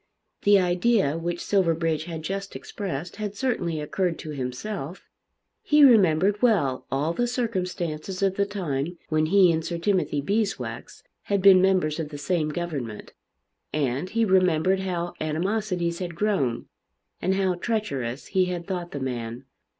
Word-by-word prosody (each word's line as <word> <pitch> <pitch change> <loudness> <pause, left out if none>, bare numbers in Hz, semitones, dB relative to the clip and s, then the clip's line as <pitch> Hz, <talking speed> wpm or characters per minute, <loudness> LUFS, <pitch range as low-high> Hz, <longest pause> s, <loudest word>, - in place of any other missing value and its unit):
The 205 -1 +5
idea 180 -2 +2
which 170 +1 -3
Silverbridge 165 -5 +1
had 165 -2 -6
just 195 +3 -4
expressed 180 -5 -5
had 210 -1 -4
certainly 190 - -1
occurred 170 +3 -1
to 155 - -7
himself. 145 +6 -5 0.6
He 300 0 +4
remembered 200 - +5
well 175 - +2
all 145 +5 0
the 240 +6 0
circumstances 185 -7 -3
of 195 -1 +3
the 200 +1 0
time 175 -5 -3
when 155 0 +2
he 185 0 +5
and 160 -1 -1
Sir 170 +1 -3
Timothy 180 -4 0
Beeswax 200 +7 -3 0.2
had 200 -1 +1
been 190 -1 +7
members 180 -5 +2
of 155 -2 -3
the 145 - -7
same 155 +1 0
government; 150 -10 -5 0.6
and 140 +3 -1
he 230 +2 +1
remembered 185 -1 +3
how 175 -2 -3
animosities 175 +2 -1
had 175 -2 -5
grown, 165 - 0 0.6
and 190 - +1
how 190 -1 +1
treacherous 150 - -3
he 190 -1 +2
had 175 -1 -4
thought 175 -2 -4
the 145 - -3
man. 120 -3 -4
175 Hz, 150 wpm, -25 LUFS, 155-195 Hz, 0.6 s, been